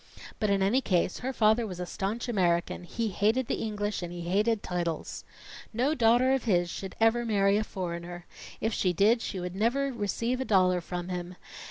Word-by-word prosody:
But 215 - +1
in 195 -1 +2
any 230 +8 +3
case, 185 -6 0
her 260 +3 -2
father 220 -1 +3
was 180 -3 -7
a 180 - -3
staunch 205 +7 -3
American; 175 -5 0
he 225 +5 -2
hated 220 +6 +1
the - - -2
English 210 -2 -2
and 175 -1 -5
he 175 0 -6
hated 205 +5 +1
titles. 175 -3 -3 0.5
No 255 +7 +1
daughter 245 0 +4
of 265 -2 -1
his 175 -5 +2
should 195 - -6
ever 225 +1 +3
marry 200 -3 +2
a 215 - +1
foreigner. 175 -3 -6 0.3
If 220 0 -1
she 180 -3 +1
did, 215 +6 +3
she 195 - -4
would 180 0 -5
never 255 +7 +1
receive 235 +3 -1
a - - +1
dollar 185 -4 +3
from 175 +1 -5
him. 180 0 -5
205 Hz, 195 wpm, -28 LUFS, 180-230 Hz, 0.5 s, daughter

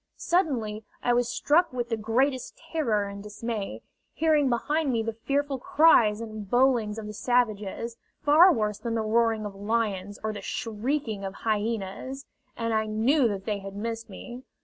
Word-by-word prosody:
Suddenly 245 - 0 0.2
I 245 - +3
was 240 0 +2
struck 335 +7 +2
with 245 -1 -3
the 230 - +1
greatest 245 +5 0
terror 230 -11 +1
and 200 0 -7
dismay, 210 - -5 0.3
hearing 305 -3 +3
behind 290 +5 0
me 230 -2 0
the 225 0 -3
fearful 275 +4 -1
cries 240 -8 +4
and 215 -3 -7
bowlings 240 -4 +3
of 220 - -5
the 210 - -6
savages, 230 -1 0 0.3
far 310 +5 +7
worse 210 - -1
than 230 -1 -3
the 225 - +1
roaring 225 0 +1
of 205 - -5
lions 205 -1 -2
or 220 0 -1
the 205 - -7
shrieking 230 -1 -2
of 195 0 -5
hyenas; 220 +4 -2 0.3
and 230 -1 -1
I 220 0 +1
knew 240 +6 +3
that 200 -3 -4
they 210 -2 -1
had 195 0 -8
missed 225 +2 -4
me. 240 +5 -9
230 Hz, 170 wpm, -27 LUFS, 210-260 Hz, 0.3 s, far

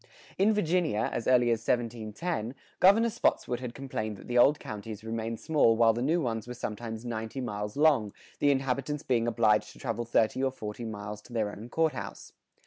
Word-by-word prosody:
In 200 +3 +5
Virginia, 170 - +1
as 115 - -3
early 125 -2 +4
as 115 - +1
1710, 115 +3 -2 0.2
Governor 225 +5 +5
Spotswood 125 - 0
had 125 -2 -6
complained 110 -6 -4
that - - -13
the 120 - -3
old 140 +5 +5
counties 105 0 -7
remained 115 0 -3
small 145 -8 +3
while 115 -1 +5
the 120 - -3
new 160 +7 +2
ones 115 -6 -2
were 125 - -6
sometimes 115 0 -5
ninety 115 +2 -4
miles 105 -2 -4
long, 145 -9 +4 0.3
the 145 - +3
inhabitants 140 +2 0
being 120 -2 +1
obliged 110 -2 +2
to - - -17
travel 120 -3 -3
thirty 115 +1 +2
or 135 - +3
forty 115 -2 -6
miles 105 -1 -6
to 120 - -15
their 110 -3 0
own 110 +4 -9
court 160 +2 +1
house. - - -8
120 Hz, 190 wpm, -29 LUFS, 110-135 Hz, 0.3 s, In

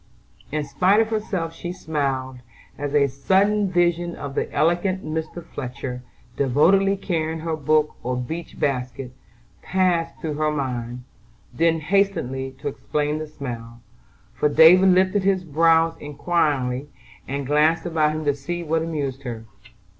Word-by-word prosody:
In 150 +1 -1
spite 180 +9 +3
of 225 -1 +2
herself 195 -7 -2
she 175 +1 -6
smiled, 135 -7 -3 0.4
as 145 0 -3
a 145 -1 +5
sudden 195 +9 +2
vision 175 -1 +1
of 140 -1 -6
the - - -2
elegant 175 +4 +1
Mr. 160 +2 -4
Fletcher, 125 -3 -6 0.3
devotedly 190 +9 +3
carrying 160 -4 -2
her 165 0 -2
book 155 0 +1
or 125 +1 -2
beach 160 +7 -6
basket, 125 -2 -2 0.5
passed 180 -3 0
through 155 -2 -3
her 155 0 +2
mind; 125 -4 -3 0.5
then 165 -1 +2
hastened 195 -4 +1 0.3
to 140 - -6
explain 150 +2 -2
the 155 - -5
smile, 120 -6 -7 0.5
for 150 - +1
David 180 +6 +7
lifted 185 +2 +3
his 190 -1 +1
brows 165 +1 +3
inquiringly, 145 -3 -1 0.4
and 140 0 -3
glanced 150 +5 +2
about 155 -3 +1
him 155 0 -4
to 145 - +3
see 170 +5 -5
what 160 0 0
amused 145 -5 -3
her. 115 -4 -6
155 Hz, 140 wpm, -23 LUFS, 140-175 Hz, 0.5 s, David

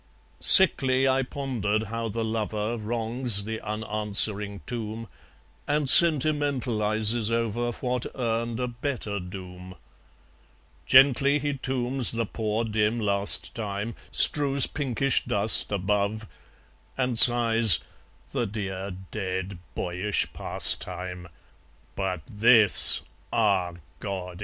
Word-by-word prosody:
Sickly 135 -8 +4
I 130 0 0
pondered 120 -6 -4
how 115 +2 -6
the 115 +2 -5
lover 110 0 -4
Wrongs 115 0 +1
the 110 +1 -7
unanswering 105 -1 -1
tomb, 115 -1 -7 0.6
And 150 0 -2
sentimentalizes 125 -8 +2
over 115 +1 -3
What 125 0 -5
earned 115 -1 -4
a 125 - -3
better 120 -4 -6
doom. 90 0 -12 1.1
Gently 135 +1 +3
he 145 -1 -4
tombs 130 -2 0
the 115 0 -3
poor 110 +1 -4
dim 110 +1 -2
last 100 -1 +2
time, 105 +1 -6 0.2
Strews 140 -2 +2
pinkish 135 -2 -2
dust 105 +1 +3
above, 100 +2 -3 0.7
And 125 -2 -3
sighs, 115 -4 +7 0.5
"The 120 - -3
dear 100 -2 -7 0.2
dead 95 -2 -6 0.2
boyish 90 +3 -4
pastime! 90 -1 -2 0.7
But 95 -3 -5
THIS 110 0 +5 0.3
ah, 100 -6 -1 0.3
God! 90 -3 -8
110 Hz, 100 wpm, -24 LUFS, 100-125 Hz, 1.1 s, sighs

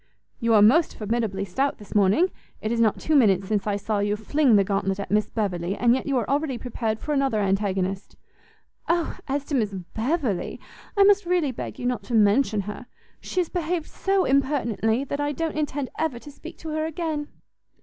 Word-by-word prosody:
"You 230 -1 +3
are 205 - +7
most 295 +10 +4
formidably 210 -3 -1
stout 270 +10 -1
this 210 - -11
morning! 210 - +3 0.3
it 215 - -3
is 235 - 0
not 220 -3 +3
two 315 - 0
minutes 195 -8 +4
since 210 0 -1
I 205 - +1
saw 205 +1 -1
you 205 +1 +1
fling 255 +3 +2
the 200 - +5
gauntlet 195 0 -1
at 200 - -5
Miss 210 0 +2
Beverley, 190 -4 -2
and 235 +2 +3
yet 260 - -2
you 275 -2 +1
are 240 - -1
already 280 -2 0
prepared 230 -3 -3
for 300 - -3
another 275 -6 +1
antagonist." 195 -1 -1 0.7
"O 335 0 +1
as 280 +1 -2
to 290 - -7
Miss 215 -7 0 0.2
Beverley, 245 - -1 0.4
I 400 - +7
must 405 -2 +4
really 350 -6 +2
beg 245 - -6
you 245 - -5
not 245 -4 0
to 240 - -2
mention 215 +1 +3
her; 210 +5 -7 0.3
she 365 - -1
has 345 - -4
behaved 345 -2 -2
so 390 -1 +1
impertinently, 260 -4 +1
that 280 +1 -4
I 290 0 -1
don't 325 +2 -2
intend 290 -3 -2
ever 315 -6 0
to 290 +5 -11
speak - - -11
to 320 - -8
her 310 0 -1
again." 315 -2 -3
240 Hz, 200 wpm, -25 LUFS, 210-295 Hz, 0.7 s, are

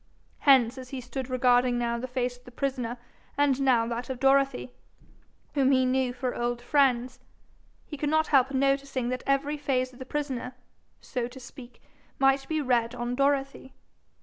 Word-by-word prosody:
Hence 260 -1 +5
as 255 -1 -10
he 265 - -5
stood 255 +1 -6
regarding 250 -1 +3
now 235 -1 -1
the 255 - -4
face 250 -1 -2
of 245 - -22
the - - -11
prisoner 250 -2 -3 0.4
and 280 -2 +2
now 250 -4 +3
that 235 +2 -4
of 260 -2 -4
Dorothy, 270 -1 +2 0.8
whom 270 -2 +3
he 260 -1 +3
knew 255 0 +1
for 250 0 -3
old 240 0 -2
friends, 250 -1 +1 0.7
he 295 - -8
could 290 +1 -1
not 315 +1 +3
help 265 -3 +3
noticing 275 -2 0
that 255 0 -3
every 280 +2 +1
phase 255 -3 -1
of 245 - -16
the 260 - -7
prisoner, 260 -4 -4 0.5
so 245 -2 -3
to 250 +2 -12
speak, 245 -1 -13 0.3
might 270 0 +2
be 310 -1 -1
read 240 -3 +1
on 240 0 -3
Dorothy. 275 0 -1
255 Hz, 175 wpm, -27 LUFS, 245-275 Hz, 0.8 s, Hence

